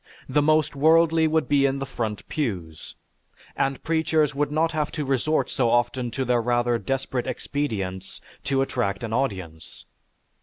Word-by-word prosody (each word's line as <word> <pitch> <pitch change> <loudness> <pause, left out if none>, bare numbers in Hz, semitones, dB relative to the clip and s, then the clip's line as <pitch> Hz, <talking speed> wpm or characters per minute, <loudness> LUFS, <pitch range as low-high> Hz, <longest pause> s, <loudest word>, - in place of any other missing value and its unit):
The 145 +3 +2
most 155 0 +2
worldly 160 +2 +4
would 160 0 +1
be 140 -1 +4
in 135 0 -1
the 135 - -3
front 110 -5 -4
pews, 90 - -4 0.6
and 135 0 -1
preachers 160 -2 +1
would 145 +1 -1
not 160 +2 +1
have 150 -2 -1
to 150 - -3
resort 135 +4 0
so 125 -5 +1
often 120 +1 +1
to 130 +3 -3
their 120 -1 +2
rather 120 0 +1
desperate 130 +3 -2
expedients 100 -10 -3 0.3
to 135 -1 +2
attract 120 -6 -2
an 110 -1 -4
audience. 95 - -4
135 Hz, 155 wpm, -24 LUFS, 115-150 Hz, 0.6 s, worldly